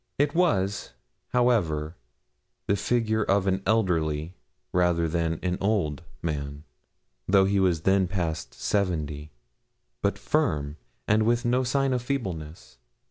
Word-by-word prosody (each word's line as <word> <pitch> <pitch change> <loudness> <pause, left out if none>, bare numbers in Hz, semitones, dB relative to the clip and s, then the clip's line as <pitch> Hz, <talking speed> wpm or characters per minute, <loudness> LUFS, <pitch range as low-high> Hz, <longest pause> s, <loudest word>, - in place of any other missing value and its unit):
It 145 +1 +2
was, 100 - +1 0.3
however, 90 -11 +1 0.7
the 100 - +2
figure 110 +1 +1
of 100 -1 +2
an 95 0 +1
elderly 85 -7 +1 0.4
rather 90 -2 +2
than 80 0 -1
an 90 0 -1
old 95 -8 0 0.2
man 70 -2 -3 0.6
though 95 0 +5
he 100 0 +2
was 90 -4 +2
then 95 +1 +3
past 80 -8 -3
seventy 75 -7 -1 0.7
but - - 0
firm, 70 +4 0 0.3
and 105 +1 +4
with 120 +2 +2
no 125 +2 +2
sign 135 +1 +1
of 125 - 0
feebleness. 85 - -5
95 Hz, 125 wpm, -26 LUFS, 80-110 Hz, 0.7 s, though